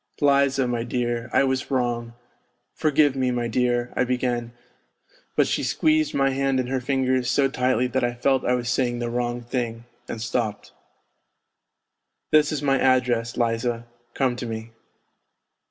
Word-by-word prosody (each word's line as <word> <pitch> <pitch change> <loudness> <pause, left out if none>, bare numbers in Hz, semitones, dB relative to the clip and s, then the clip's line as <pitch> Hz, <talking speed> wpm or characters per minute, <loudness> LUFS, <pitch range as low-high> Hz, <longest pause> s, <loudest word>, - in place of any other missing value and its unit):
" - - -25
Liza, 140 -2 +3
my 120 -1 -1
dear, 120 -1 -2
I - - +4
was 130 -1 -1
wrong... 120 -3 -1 0.6
forgive 150 -2 +2
me, 130 -1 +1
my 120 -1 -1
dear," 120 +1 0
I - - +2
began, 125 -2 -1 0.8
but - - +4
she - - -1
squeezed 310 0 +1
my 135 -1 +2
hand 135 0 0
in 130 - 0
her 130 +1 -1
ringers 130 -1 0
so 135 +1 +3
tightly 125 -2 +1
that 125 +1 -1
I 120 0 0
felt 135 +2 +1
I 125 - +2
was 120 -1 -3
saying 125 -1 0
the 120 0 -3
wrong 120 0 -2
thing 120 -1 -3 0.2
and 115 - -5
stopped. 110 -2 -3 0.8
" - - -56
This 155 0 +4
is 150 -2 -3
my 135 -2 +2
address, 125 -3 +2
Liza, 115 0 -1 0.3
come 130 -3 +1
to 125 - -5
me." 110 0 -6
125 Hz, 165 wpm, -24 LUFS, 120-135 Hz, 0.8 s, I